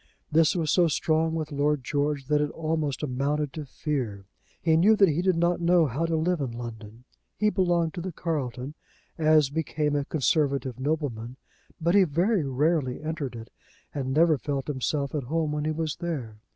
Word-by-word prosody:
This 160 +2 +4
was 160 -4 0
so 175 -2 +4
strong 160 +1 +1
with 155 -1 -3
Lord 145 -1 +1
George 145 +1 -1
that 150 +2 +2
it 150 - 0
almost 155 -3 -2
amounted 140 +1 -1
to 155 -2 -6
fear. 125 -10 -3 0.3
He 160 -2 +2
knew 200 +7 +5
that 195 -3 +5
he 160 +3 0
did 185 -1 +2
not 170 +1 +1
know 170 -1 +4
how 145 +5 -1
to 165 - 0
live 165 +1 0
in 130 -4 -3
London. 115 -1 -8 0.3
He 210 0 +2
belonged 175 -5 +1
to 175 - -5
the 185 +1 -4
Carlton, 145 -5 -3 0.5
as 155 -3 +4
became 150 -1 -1
a 145 - +1
conservative 140 -4 0
nobleman; 130 -5 -2 0.4
but 170 +1 +1
he 200 -1 +6
very 175 +4 +1
rarely 140 0 0
entered 155 -5 -4
it, 115 0 -9 0.4
and 130 -3 -3
never 155 0 +4
felt 140 -1 -3
himself 140 0 -2
at 145 -5 -2
home 155 +2 -1
when 150 0 -2
he 155 - +1
was 155 -1 -2
there. 130 -11 -5
150 Hz, 185 wpm, -27 LUFS, 135-165 Hz, 0.5 s, he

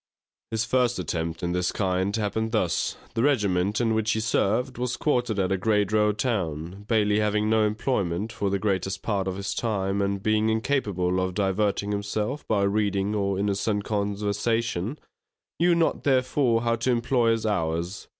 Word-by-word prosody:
His 110 0 -1
first 125 0 +1
attempt 80 0 -3
in 85 - 0
this 90 0 0
kind 95 0 0
happened 110 +1 -1
thus. 90 -7 0 0.2
The 115 - 0
regiment 105 -7 +2
in 115 -2 +2
which 110 0 +1
he 110 - -1
served 115 +3 0
was 125 0 -1
quartered 125 -7 0
at 95 -1 0
a 95 - +2
great 105 0 +1
road 105 -1 +2
town; 95 - -2
Bailey 105 -2 +2
having 105 0 +1
no 110 -1 +4
employment 105 -3 -1
for 100 -2 -1
the 100 - +1
greatest 95 -1 -1
part 100 -3 -1
of 95 - -2
his 100 +1 -3
time, 100 -3 -1
and 100 0 -1
being 110 0 +2
incapable 105 -7 0
of 95 -1 -2
diverting 100 +1 0
himself 105 +7 -3
by 100 -2 +2
reading 100 0 +1
or 100 -2 0
innocent 100 +1 0
conversation, 105 - -1 0.6
knew 175 0 +4
not 165 -1 +1
therefore 130 -3 +2
how 115 0 +2
to 115 +3 -1
employ 120 0 +2
his 115 -1 +1
hours. 85 -2 -2
105 Hz, 170 wpm, -26 LUFS, 95-115 Hz, 0.6 s, no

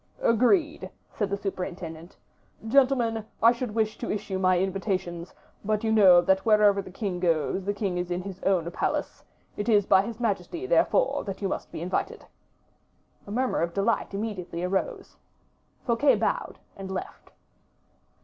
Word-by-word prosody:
"Agreed," 295 - +2 0.2
said 205 -3 -2
the 200 - -1
superintendent. 180 -4 -6 0.5
"Gentlemen, 240 -3 +2 0.2
I 230 - +8
should 240 -3 -4
wish 215 -1 0
to - - -4
issue 195 -2 -3
my 185 -1 +3
invitations; 185 -2 -2 0.3
but 215 +1 -1
you 220 - +1
know 190 -5 +7
that 190 +2 +2
wherever 210 -3 +4
the 195 - -11
king 185 -1 -4
goes, 175 +2 0
the 205 - 0
king 195 -4 -2
is 180 0 -3
in 180 +1 -2
his 190 -1 -8
own 175 -3 +1
palace; - - -2 0.3
it 205 +3 -2
is 205 -3 +4
by 190 -1 +5
his 225 +3 -7
majesty, 230 - -2
therefore, - - +2
that 195 -2 -5
you 200 - -1
must - - -5
be - - -6
invited." 180 - -3 1.0
A - - -7
murmur 250 -1 0
of 170 0 -2
delight 200 0 0
immediately 190 -5 -4
arose. 190 +1 -3 0.7
Fouquet 250 +4 +3
bowed - - -2 0.2
and 195 -1 -8
left. 190 -1 -7
200 Hz, 160 wpm, -26 LUFS, 185-225 Hz, 1.0 s, I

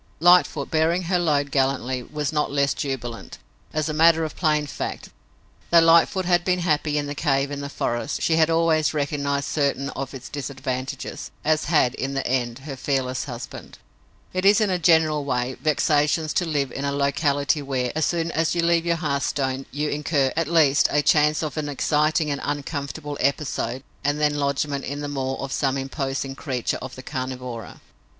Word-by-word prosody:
Lightfoot, 175 -4 +4
bearing 165 +3 +2
her 180 +1 +1
load 145 -4 +1
gallantly, 130 -2 0
was 150 +3 -4
not 150 -2 0
less 140 -1 +2
jubilant. 120 -4 -5 0.3
As 155 0 -1
a 155 - -2
matter 165 +1 +5
of 155 - -4
plain 150 -3 +1
fact, 145 - -5 0.6
though 170 - +7
Lightfoot 165 +3 +4
had 175 -1 +3
been 180 0 +1
happy 150 -3 +1
in 145 - 0
the 145 - -4
cave 140 -2 0
in 145 0 -4
the 140 - -5
forest, 120 0 -2
she 160 - +2
had 160 0 +4
always 165 -2 +2
recognized 140 -1 -1
certain 140 -2 -1
of 135 0 -6
its 130 -1 -8
disadvantages, 135 -2 -5 0.2
as 155 0 +2
had, 145 -6 +3
in 135 +1 -3
the 135 - -1
end, 120 -2 -1
her 140 -3 -5
fearless 130 -1 -1
husband. - - -8 0.6
It 185 0 -1
is, 205 +3 +6
in 210 -3 +2
a 180 - 0
general 160 -3 +3
way, 125 -1 -1
vexatious 150 +1 +2
to 180 - +1
live 145 -5 -1
in 135 - -5
a 140 - 0
locality 140 +1 +1
where, 130 -3 -2
as 155 - 0
soon 170 -1 -1
as 160 +1 0
you 170 - +1
leave 170 0 +2
your 170 - +3
hearthstone, 140 -3 -1
you 150 +2 -2
incur, 145 -2 0
at 165 -1 0
least, 155 -3 +4
a 145 0 +2
chance 150 +1 +3
of 155 0 -4
an 150 -1 -2
exciting 150 +2 +1
and 140 - -3
uncomfortable 145 0 -4
episode 135 -3 -1 0.2
and 145 +2 0
then 150 -1 +2
lodgment 140 0 -1
in 145 +2 -4
the 145 - -3
maw 135 -2 -2
of 135 0 -6
some 135 -1 0
imposing 135 0 -3
creature 130 -3 -2
of 130 0 -7
the 130 - -10
carnivora. 125 -4 -6
145 Hz, 185 wpm, -23 LUFS, 135-155 Hz, 0.6 s, though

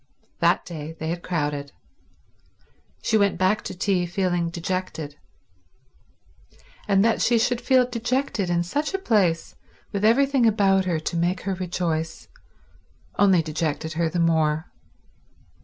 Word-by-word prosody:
That - - +2
day 160 -2 -7
they 160 - -3
had 170 +1 -3
crowded. 145 -5 -3 1.3
She 220 - +2
went 200 -3 +2
back 185 +4 +2
to - - -6
tea 185 -2 +1
feeling 175 -2 0
dejected, 170 -3 -4 1.7
and 200 0 +4
that 230 - +2
she 235 - +3
should 245 +1 +1
feel 255 -2 +4
dejected 245 -4 -1
in 175 0 +1
such 295 - -2
a - - +2
place 195 - +1 0.4
with 200 0 -3
everything 265 +2 +4
about 195 -3 +3
her 170 -3 0
to 165 - -3
make 175 +2 0
her 195 +1 -2
rejoice, 170 -3 -3 0.9
only 190 -5 +5
dejected 155 0 -3
her 165 0 0
the 175 - -2
more. 160 -1 +1
180 Hz, 135 wpm, -24 LUFS, 165-210 Hz, 1.7 s, only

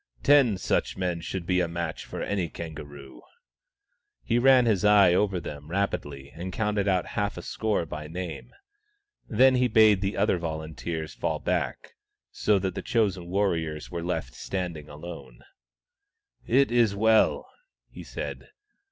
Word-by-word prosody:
Ten 135 -8 +5
such 95 - -1
men 90 -2 -2
should 90 +1 -5
be 90 +1 +1
a 90 - +1
match 85 -1 -4
for - - -5
any 95 -5 -1
kangaroo," 70 -5 -9 1.0
He 120 +1 +1
ran 130 -1 +6
his 105 -6 +2
eye 100 -4 +6
over 95 0 +1
them 75 -1 -8
rapidly 75 -7 -3
and 90 +3 -6
counted 105 0 -1
out 95 -2 +2
half 100 -1 -1
a - - -6
score 110 -6 -1
by 75 -1 -7
name. 85 +1 -6 0.8
Then 130 +4 +5
he 125 0 +3
bade 110 -3 +5
the 100 +1 -2
other 100 -2 +2
volunteers 80 -2 -5
fall - - -2
back, - - -2 0.4
so 105 -1 +2
that 95 -1 -2
the - - -4
chosen 100 -6 0
warriors 85 -5 -1
were 85 -1 -4
left 90 +1 -3
standing 85 -6 -5
alone. 75 -6 -10 1.0
"It 135 +1 +3
is 115 -4 +3
well," 110 +1 +3 0.4
he - - -11
said. - - -6
90 Hz, 150 wpm, -27 LUFS, 80-105 Hz, 1.0 s, ran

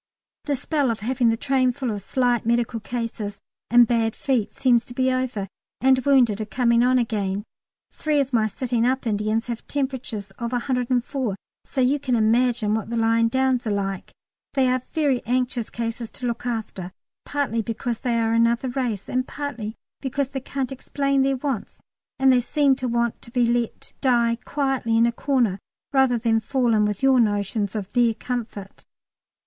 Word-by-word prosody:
The 290 - 0
spell 285 0 0
of 225 -3 -2
having 245 +1 +2
the 225 - +1
train 260 -1 +2
full 255 -2 -3
of 205 -1 -4
slight 245 +2 +1
medical 235 0 0
cases 225 -3 -4 0.3
and 240 +1 +7
bad 225 -1 +1
feet 250 -7 -1
seems 245 -3 +3
to 245 - -10
be 260 0 +2
over, 255 -6 -2 0.3
and 260 0 +4
wounded 245 -7 +4
are - - -2
coming 235 +2 +2
on 255 +1 +4
again. 205 -4 -1 0.5
Three 305 -2 0
of 275 -1 -1
my 220 -2 +3
sitting 235 +2 -1
up 260 +2 +1
Indians 215 +1 0
have 235 -2 -6
temperatures 255 -8 -3
of 235 +1 -3
104, 250 -2 -1 0.3
so 265 - -2
you 265 +3 +3
can 255 -3 0
imagine 230 -1 +2
what 220 -1 -2
the 235 - -2
lying 230 0 +3
downs 260 0 +1
are - - 0
like. 195 -2 -3 0.4
They 265 -2 +3
are 255 0 +1
very 285 -6 +1
anxious 245 -1 0
cases 230 0 -4
to 255 - -7
look 240 0 -2
after, 215 -6 -4 0.3
partly 280 -6 -1
because 230 +1 -3
they 240 -2 0
are 225 0 +1
another 230 +2 +2
race 245 -6 -2
and 255 0 -1
partly 245 -7 -5 0.3
because 275 0 -1
they 270 - -4
can't 265 0 -3
explain 275 +1 0
their 270 0 +2
wants, 260 -5 -3 0.4
and 265 -1 +5
they 250 - +5
seem 280 +2 +2
to 255 - -2
want 235 -1 0
to - - -11
be 245 0 +2
let 235 -1 -2
die 235 -3 +2
quietly 270 -5 0
in 230 - +5
a 235 - +2
corner 235 -6 0 0.3
rather 265 -3 +4
than 225 -1 +2
fall 245 +1 +1
in 210 -1 +3
with 210 +3 -3
your 265 -1 +5
notions 205 -1 0
of 205 -3 -5
their 235 -2 +3
comfort. 225 -6 -6
240 Hz, 180 wpm, -23 LUFS, 225-260 Hz, 0.5 s, and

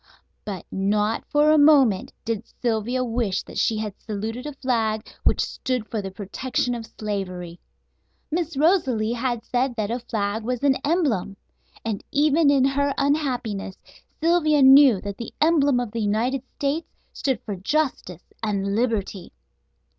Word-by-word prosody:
But 195 -4 -6
not 210 +3 0
for 295 +1 +4
a 310 - +5
moment 275 -9 +5
did 225 -1 -3
Sylvia 240 +2 0
wish 230 -5 -1
that - - -6
she 220 - +1
had 215 -2 -3
saluted 225 +5 -5
a 295 - -5
flag 225 -5 -1 0.2
which - - +3
stood 250 -4 -3
for 220 - -1
the 195 - -5
protection 215 +6 -2
of 230 -2 -6
slavery. 185 -5 -5 0.7
Miss 330 -2 -2
Rosalie 270 - +2
had 240 -1 -2
said 250 0 0
that 215 -1 -2
a 240 - -1
flag 220 -2 -2
was 250 +2 -3
an 275 -2 +4
"emblem," 270 - 0 0.5
and 215 -3 -3
even 300 +1 +3
in 275 -2 +4
her 280 +1 +1
unhappiness 250 -9 -1 0.4
Sylvia 310 -3 +3
knew 265 -5 +8
that 200 -1 -6
the 235 - -8
emblem 290 -5 +3
of 245 -3 -3
the 230 0 -3
United 225 +6 0
States 290 +4 -1 0.3
stood 265 -5 -1
for 205 - -4
justice 195 - -2
and 200 -2 -1
liberty. 210 - -2
240 Hz, 150 wpm, -24 LUFS, 210-280 Hz, 0.7 s, knew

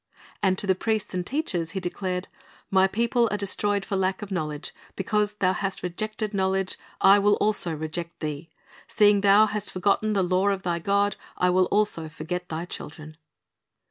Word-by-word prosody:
"' - - -24
And 185 -1 +2
to - - 0
the 190 - +3
priests 215 +2 -2
and 180 -1 -1
teachers 180 - -2
He - - +1
declared, 180 0 -3 0.4
"My 190 0 +5
people 235 +3 +1
are 210 - -1
destroyed 200 0 0
for 200 - -2
lack 190 +1 0
of 205 - -8
knowledge; 155 -5 -4 0.2
because 210 +2 0
thou 185 -3 +1
hast 195 +1 -3
rejected 215 +4 -3
knowledge, 190 -1 0 0.2
I 195 +1 +7
will 205 +1 +4
also 205 -6 +1
reject 165 +2 -5
thee;... 155 +1 -5 0.4
seeing 205 -1 +4
thou 205 +2 +6
hast 210 -1 -3
forgotten 205 +3 +1
the 195 -2 +2
law 185 +2 +1
of 195 -1 -1
thy 170 -1 -1
God, 200 +3 +1 0.2
I 180 0 +3
will 185 +1 +4
also 200 -7 0
forget 180 +3 -5
thy 165 +2 -4
children." 155 -2 -9
190 Hz, 180 wpm, -25 LUFS, 180-205 Hz, 0.4 s, I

